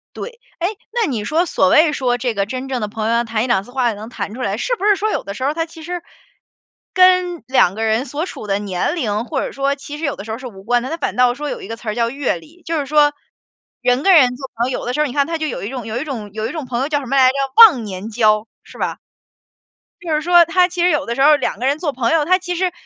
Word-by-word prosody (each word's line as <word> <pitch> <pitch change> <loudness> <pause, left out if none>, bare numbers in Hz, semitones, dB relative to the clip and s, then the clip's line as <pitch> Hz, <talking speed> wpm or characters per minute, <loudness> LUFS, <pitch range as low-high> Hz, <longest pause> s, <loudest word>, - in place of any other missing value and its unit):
对。 475 -1 -8 0.2
哎， 345 - +1 0.2
那 470 -3 0
你 220 -5 -2
说 325 +9 +1
所 190 - +2
谓 310 - +5
说， 250 -3 0
这 245 -1 -2
个 200 -1 -1
真 255 +4 -5
正 260 -3 -3
的 210 - -1
朋 215 +1 -4
友 230 - +1
要 235 0 +2
谈 220 -1 -1
1-2 240 -6 +1
次 245 - -15
话 255 -2 +1
也 - - -2
能 215 +3 -9
谈 215 - -5
出 255 - -7
来， 200 -2 -1
是 485 - -1
不 410 -2 -4
是 415 -1 +5
说 425 +2 -1
有 - - -2
的 200 - -6
时 255 - -6
候， 280 +3 +1
它 330 +1 -1
其 325 -1 -13
实 355 +1 -5 0.9
跟 365 -2 +4
2 225 -8 +3
个 225 - -3
人 220 +4 +1
所 290 +5 -3
处 215 - -8
的 200 0 0
年 195 - -2
龄 220 -6 -2
或 270 0 -2
者 - - -4
说 275 +1 -1
其 290 +1 -9
实 320 - -9
有 280 - -1
的 200 - -8
时 220 - -6
候 220 - -3
是 255 0 -8
无 195 -4 -12
关 240 +3 +1
的， 260 - -5
它 330 - -3
反 - - -3
倒 250 -1 +4
说 295 +2 -5
有 - - -5
一 - - -8
个 225 - -5
词 230 -1 -7
儿 215 - -3
叫 235 -1 +1
阅 275 -8 -1
历。 325 - -18
就 325 -1 -2
是 285 - -2
说， 295 0 +3 0.7
人 250 +2 +1
跟 390 - +5
人 250 -5 +5
做 265 0 -8
朋 235 +2 0
友， - - -2
有 - - -7
的 245 - -2
时 300 - -2
候 300 - +3
你 260 - -5
看 280 0 +1
他 330 0 -2
就 310 -1 -2
有 - - -5
一 200 - -4
种 250 -3 -6
有 225 +1 -4
一 - - -3
种 235 -9 -6
有 220 +1 -3
一 - - -5
种 315 -5 -5
朋 245 -1 -2
友 275 - -1
叫 290 -2 +1
什 275 - -8
么 265 +3 -2
来 260 -1 +6
着， 260 - -1 0.2
忘 365 - +9
年 200 +1 -6
交 215 -1 +2 0.2
是 - - -15
吧？ - - -2 1.0
就 335 -3 -3
是 305 - 0
说 345 +1 +6
他 360 +2 +3
其 360 -1 -4
实 355 - +4
有 300 -4 +1
的 235 - -3
时 270 - -1
候 300 +1 +7
2 - - -2
个 255 - -2
人 280 +2 +2
做 315 -2 -2
朋 245 -1 -1
友， 320 -2 +3
他 370 +4 +3
其 360 -1 -4
实 365 +1 0
265 Hz, 325 characters per minute, -19 LUFS, 230-320 Hz, 1.0 s, 忘